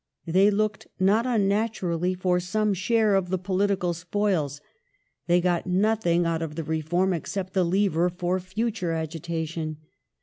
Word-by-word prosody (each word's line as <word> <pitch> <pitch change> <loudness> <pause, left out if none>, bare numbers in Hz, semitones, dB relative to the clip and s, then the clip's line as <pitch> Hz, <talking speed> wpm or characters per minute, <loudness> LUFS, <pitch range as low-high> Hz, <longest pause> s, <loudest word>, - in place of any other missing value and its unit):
They 190 +4 +4
looked, 210 0 -1
not 210 +6 +3
unnaturally, 195 -5 0
for 180 -1 +1
some 210 +4 0
share 215 +3 +2
of 190 -2 +1
the 185 - 0
political 185 -1 0
spoils. 175 -5 -1 0.7
They 175 0 +4
got 175 0 0
nothing 180 -2 +2
out 165 -1 0
of 155 -1 -5
Reform 165 +4 0
except 185 +3 -4
a 190 - +4
lever 180 -1 +2
for 180 +1 -1
future 185 -1 -2
agitation. 160 -1 -4
180 Hz, 135 wpm, -26 LUFS, 170-200 Hz, 0.7 s, They